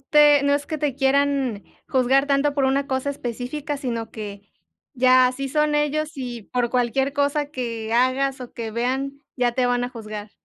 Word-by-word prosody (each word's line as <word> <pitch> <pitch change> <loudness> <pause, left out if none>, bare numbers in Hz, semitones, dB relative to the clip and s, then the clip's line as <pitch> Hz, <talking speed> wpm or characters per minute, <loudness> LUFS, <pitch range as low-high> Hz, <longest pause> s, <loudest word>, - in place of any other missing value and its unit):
te 295 0 +5
no 285 0 +3
es 285 0 -1
que 310 - -4
te 285 -3 -1
quieran 270 -5 +1 0.2
juzgar 265 +1 +3
tanto 285 0 +2
por 275 -2 +1
una 275 +1 +1
cosa 265 +1 -1
específica, 275 +3 -4
sino 235 -5 -4
que 205 -2 -8 0.5
ya 255 0 +5
así 270 +2 -3
son 300 +1 +1
ellos, 300 +2 0
y 240 -5 -6
por 245 -1 0
cualquier 255 +2 +1
cosa 285 0 0
que 230 -5 -4
hagas 260 +2 +2
o 245 - -8
que 225 -2 -5
vean, 265 +4 -2 0.2
ya 245 -1 +1
te 250 0 +1
van 245 0 +1
a - - -3
juzgar. 215 -3 -8
265 Hz, 185 wpm, -23 LUFS, 245-285 Hz, 0.5 s, te